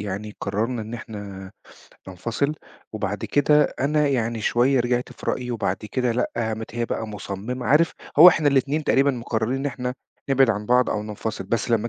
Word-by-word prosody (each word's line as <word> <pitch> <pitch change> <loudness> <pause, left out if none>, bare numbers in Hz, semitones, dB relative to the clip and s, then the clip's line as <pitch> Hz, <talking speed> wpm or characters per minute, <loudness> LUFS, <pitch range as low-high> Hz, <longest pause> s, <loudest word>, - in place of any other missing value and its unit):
يعني 105 +1 -5
قرَّرنا 115 +3 -2
إن 110 +2 -7
إحنا 100 -4 -8 0.6
ننفصِل 115 - -2 0.4
وبعد 105 -2 -3
كده 150 +1 +4 0.2
أنا 150 +2 +2
يعني 115 -4 -1
شوية 125 +4 +2
رجعت 120 +1 -1
في - - -12
رأيي 125 -1 -3
وبعد 105 -5 -1
كده 120 +3 -2
لأ، 125 - -1
قامت 110 0 -3
هي 120 0 -1
بقى 110 - -3
مصمِّمة.عارف، 125 - 0 0.3
هو 175 +3 +12
إحنا 155 -3 +3
الاتنين 140 +3 +1
تقريبًا 140 +1 +3
مقرَّرين 115 -1 -2
إن 135 - -2
إحنا 125 -2 -3 0.3
نبعِد 135 -3 +4
عن 105 -1 -3
بعض 125 +1 +3
أو 105 - -1
ننفصل، 105 -1 -5
بس 115 +4 -1
لمّا 115 0 +1
120 Hz, 170 wpm, -23 LUFS, 105-135 Hz, 0.6 s, هو